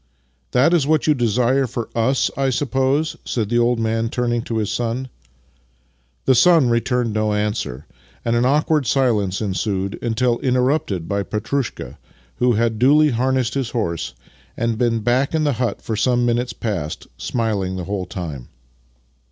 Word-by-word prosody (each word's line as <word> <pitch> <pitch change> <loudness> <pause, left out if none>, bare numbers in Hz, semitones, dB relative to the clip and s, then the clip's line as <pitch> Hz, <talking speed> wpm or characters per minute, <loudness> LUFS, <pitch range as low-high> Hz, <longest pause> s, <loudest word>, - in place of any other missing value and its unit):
" 65 -2 -43
That 140 +7 +4
is 155 -5 +2
what 155 0 +2
you 155 - +4
desire 125 +2 +1
for 120 -1 -4
us, 125 +4 +1
I 135 -1 +1
suppose? 135 +4 0
" - - -38
said 110 -4 -2
the 120 0 +2
old 120 0 +2
man, 115 0 0
turning 120 -1 -1
to 115 - -2
his 105 -2 -1
son. 120 +2 -2 1.2
The 130 - +5
son 150 -1 +5
returned 120 -1 0
no 110 0 0
answer, 105 - -2 0.4
and 115 0 +1
an 120 - +2
awkward 150 +1 +2
silence 110 -7 +1
ensued 100 -1 -2
until 120 +1 0
interrupted 125 - 0
by 100 0 -1
Petrushka, 110 +6 -3 0.4
who 125 0 +3
had 115 0 0
duly 150 +4 +5
harnessed 130 0 0
his 135 -4 -2
horse 85 - -3 0.4
and 115 -1 0
been 115 -2 +1
back 125 +7 +1
in 155 - +1
the 145 -2 +2
hut 120 - -2
for 110 - -2
some 120 +2 +2
minutes 120 +1 0
past, 90 -9 -4
smiling 100 - -1
the 90 - -4
whole 95 0 -3
time. 80 -9 -6
120 Hz, 165 wpm, -20 LUFS, 105-130 Hz, 1.2 s, The